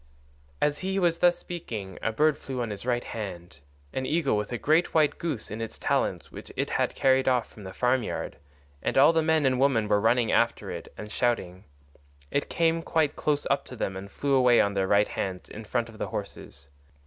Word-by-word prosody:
As 150 0 +1
he 190 +1 -2
was 170 -3 +2
thus 175 -1 +4
speaking 110 - -7
a 115 - 0
bird 150 +6 +3
flew 130 -3 -4
on 115 - -4
his 105 +4 -7
right 120 -1 +1
hand—an 85 - -7
eagle 150 -2 +1
with 105 +1 -2
a 120 - -1
great 160 +8 +2
white 155 -2 +3
goose 150 -13 -3
in 110 +2 -5
its 115 - -5
talons - - -1
which - - -10
it - - -2
had - - 0
carried 130 0 +3
off 125 -2 +2
from 105 - -13
the 95 - -6
farm 125 +5 +1
yard—and 70 - -6
all 145 +5 +7
the 160 - +3
men 160 -2 +2
and 130 -1 +2
women 130 -6 +3
were 105 -1 +2
running 115 +1 +3
after - - +1
it - - -7
and 105 0 -8
shouting. 105 -7 -1 0.7
It 140 - -1
came 165 0 +1
quite 160 -3 0
close 145 -1 0
up 140 - +1
to 125 - -10
them 95 -4 -3
and 95 +1 -7
flew 140 +6 -1
away 125 -2 +5
on 100 - +2
their 95 -1 0
right 100 +1 +4
hands 95 -2 -4
in 110 +1 -9
front 120 +1 -1
of 110 -2 -13
the - - -2
horses. 70 0 -7
120 Hz, 210 wpm, -27 LUFS, 100-145 Hz, 0.7 s, all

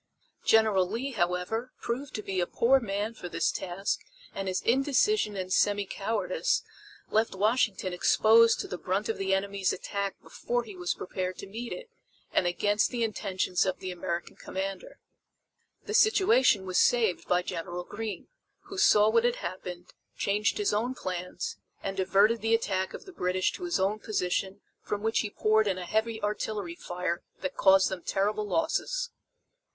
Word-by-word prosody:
General 215 -5 +4
Lee, 245 +7 -3
however, 185 +4 -1
proved 260 +4 -4
to 215 - -4
be 190 -2 -2
a 175 - +1
poor 265 +3 +4
man 210 -1 -2
for 180 -5 -8
this - - +1
task 190 +2 -2 0.3
and 195 0 -4
his 185 0 -1
indecision 270 - +2
and 185 -1 -3
semi 205 0 +2
cowardice 475 - -1 0.5
left 220 -1 +2
Washington 205 -2 +1
exposed 225 +5 +5
to - - -3
the 180 - -6
brunt 195 +4 -1
of 225 - -2
the 195 0 -1
enemy's 195 0 +1
attack 200 +1 -3
before 240 0 -2
he 210 -4 -10
was 180 -1 -2
prepared 185 0 -4
to - - -7
meet 230 +5 -6
it - - -6 0.5
and 180 - +3
against 205 +4 +2
the 240 -2 -1
intentions 190 -4 0
of 185 -1 -1
the 185 - -5
American 175 -1 -4
commander. 190 0 -5 0.9
The 430 - -4
situation 375 - +4
was 185 -1 +1
saved 225 -7 +2
by 180 0 +2
General 175 0 -4
Greene, 210 +1 -6 0.3
who 390 - -7
saw 210 - +6
what 230 +1 +4
had 240 0 +2
happened, 180 -1 -7 0.2
changed 205 +1 +1
his 415 -1 +1
own 240 +5 0
plans 180 -3 -4 0.3
and 195 - -3
diverted 195 +4 +3
the 225 +1 +3
attack 190 -4 -1
of - - -10
the 380 - -11
British 185 - 0
to 360 - -6
his 345 -1 0
own 200 +3 +1
position 195 -1 -2 0.2
from 205 0 -4
which 225 +1 +2
he 210 - -1
poured 215 +1 +2
in 190 -2 0
a 180 - -5
heavy 220 +4 0
artillery 210 -3 -2
fire 175 0 -3 0.2
that 280 - -3
caused 190 0 +5
them 190 -2 -5
terrible 210 +4 0
losses. 475 - -1
205 Hz, 170 wpm, -29 LUFS, 185-230 Hz, 0.9 s, saw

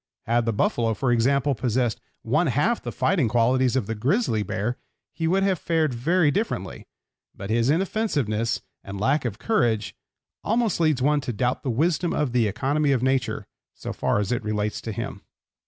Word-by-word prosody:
Had 120 +1 +1
the - - +3
buffalo, 115 +1 +1
for 125 +2 0
example, 135 +4 +2
possessed 120 -1 -1 0.2
one 155 +9 +2
half 150 - +1
the - - -5
fighting 170 -11 +1
qualities 125 +3 +2
of 130 -6 +1
the 115 - -3
grizzly 120 - +1
bear 110 +3 -3 0.3
he 165 - -2
would 190 +3 +2
have 190 -4 +1
fared 160 -5 0
very 155 +6 +2
differently, 195 - -3 0.5
but 100 +2 -6
his 115 +2 +2
inoffensiveness 145 - 0 0.2
and 100 0 -7
lack 135 +6 +1
of 110 -4 -3
courage 115 - 0 0.5
almost 225 -3 +1
leads 155 -6 +2
one 145 +1 +3
to 130 - -3
doubt 125 +3 -1
the 135 - -3
wisdom 160 +7 +1
of 145 -4 0
the 120 -3 +2
economy 140 +7 0
of 130 -3 +1
nature 130 -1 0 0.3
so - - -6
far - - 0
as 105 +1 -1
it 120 - -1
relates 105 0 -2
to 115 - -5
him. 100 - -5
130 Hz, 180 wpm, -24 LUFS, 115-155 Hz, 0.5 s, the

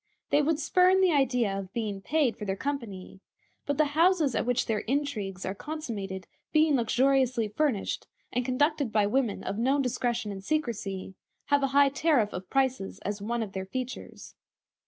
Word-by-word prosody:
They 290 - +5
would 305 +1 +1
spurn 365 +3 +4
the 375 -2 +4
idea 250 -8 +2
of 195 -1 -5
being 210 -4 -3
paid 280 -1 +1
for - - -8
their 195 -2 -1
company; 210 -8 -5 0.5
but 285 - 0
the 310 - +4
houses 330 -4 +3
at - - -1
which 245 0 +1
their 220 -3 0
intrigues 220 -9 -2
are 190 - -2
consummated 205 -9 -5 0.3
being 310 -1 +4
luxuriously 255 0 +2
furnished, 245 -2 -1 0.3
and 250 - +1
conducted 285 +1 +1
by 210 -1 +3
women 230 0 0
of 200 - -3
known 270 +4 +2
discretion 240 -3 -1
and 195 -1 -7
secrecy, 210 -10 -2 0.4
have 285 0 +4
a 275 - +2
high 285 -1 +7
tariff 275 -7 +2
of 180 0 -6
prices 260 -7 0
as 205 +1 -3
one 235 +2 -1
of 205 - -7
their 190 0 -5
features. 255 +5 -6
245 Hz, 175 wpm, -28 LUFS, 205-285 Hz, 0.5 s, high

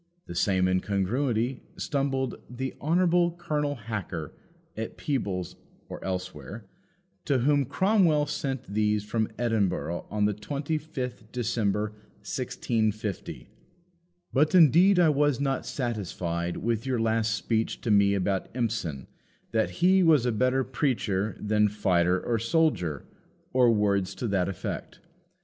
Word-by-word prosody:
The - - -7
same 95 +1 +2
incongruity 110 +7 0 0.2
stumbled 135 -2 -1
"the 130 +2 -4
Honourable 175 +2 +3
Colonel 150 -4 -1
Hacker, 105 - -5 0.4
at 110 +1 -5
Peebles 100 -11 -2 0.3
or - - -7
elsewhere," 95 - -5 0.6
to 140 -4 +2
whom 140 +2 +2
Cromwell 170 - +3
sent 140 -3 -3
these 105 0 +1
from 110 +1 -1
Edinburgh 100 -7 -1
on 105 0 +1
the 105 - +2
25th 140 -1 -4
December 105 -3 0 0.3
1650 110 -3 -2 0.8
"But 150 +6 +3
indeed 180 +4 +6
I 175 -3 +5
was 145 -2 +2
not 135 -1 -1
satisfied 90 -8 -3
with 115 +1 -1
your 130 -3 0
last 110 -1 +1
speech 115 -1 -1
to 115 - -1
me 100 -1 +4
about 95 0 -1
Empson, 105 - -2 0.5
that 110 -1 +1 0.2
he 190 +1 +6
was 155 -8 +5
a 125 - +2
better 130 +4 +2
preacher 110 -8 -1
than 105 0 +2
fighter 90 -3 +2
or 115 +3 -1
soldier 115 - +1 0.5
or 125 -2 +5
words 100 -4 +1
to 120 - -3
that 95 -2 +1
effect. 95 - -5
115 Hz, 125 wpm, -27 LUFS, 100-140 Hz, 0.8 s, indeed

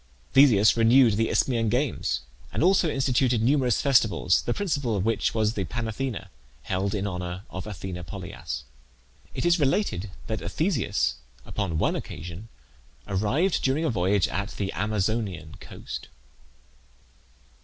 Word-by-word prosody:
Theseus 125 -6 +6
renewed 115 +1 +5
the 110 +2 +1
Isthmian 115 -4 +1
Games, 125 - 0 0.3
and - - 0
also 180 -2 +4
instituted 130 -3 +2
numerous 125 0 +2
festivals, 105 - +3
the - - -2
principal 145 - -1
of 100 0 -1
which 115 0 0
was 110 -1 +1
the 100 - -2
Panathenaea, 115 - -4 0.3
held 95 +2 -1
in 100 -1 -2
honour 90 -1 -4
of 95 +3 -6
Athene 90 -2 -6
Polias. 70 -4 -6 0.7
It - - -2
is 175 0 +4
related 135 - 0 0.2
that 110 -1 -3
Theseus 115 - 0 0.3
upon 95 -7 -2
one - - +1
occasion 90 +7 -7 0.6
arrived 120 - +1
during 140 +5 +1
a 155 - +1
voyage 95 -1 +2
at 100 +1 -2
the 95 -2 -2
Amazonian 105 -5 -2
coast. - - -8
110 Hz, 135 wpm, -26 LUFS, 95-130 Hz, 0.7 s, Theseus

